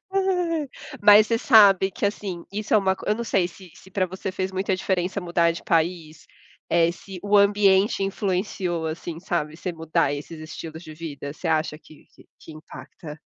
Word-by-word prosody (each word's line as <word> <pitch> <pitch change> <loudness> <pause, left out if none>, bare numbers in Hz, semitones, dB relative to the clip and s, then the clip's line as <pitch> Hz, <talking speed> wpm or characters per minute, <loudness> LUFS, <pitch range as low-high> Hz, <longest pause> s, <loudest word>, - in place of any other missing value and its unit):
Ai. 355 -6 0 0.3
Mas 210 +1 +8
você 230 +1 0
sabe 200 -6 +6
que, 230 +4 -5
assim, 200 -4 -3
isso 210 +1 -1
é - - +8
uma 190 -1 +1
co - - -12
eu 210 - +3
não 235 +2 -4
sei 185 -5 +1
se 180 0 -15
se 190 - -17
pra 190 0 0
você 190 +1 -5
fez 185 0 -3
muita 190 0 -1
diferença 185 +1 -1
mudar 170 -2 +1
de 165 - -6
país? 165 -2 -1 0.4
Eh, 170 0 +3
se 185 +1 -10
o 205 0 +4
ambiente 200 0 +3
influenciou, 190 -3 -2
assim, 160 +1 -5
sabe, 160 -3 -3
você 180 +1 -4
mudar 160 -3 0
esses 150 +3 -7
estilos 160 +1 -8
de 155 -2 -10
vida. 150 -3 -7
Você 165 +3 -5
acha 155 -1 0
que 155 -1 -18
que - - -20
que 160 - -12
impacta? 155 0 -11
185 Hz, 190 wpm, -24 LUFS, 165-200 Hz, 0.4 s, Mas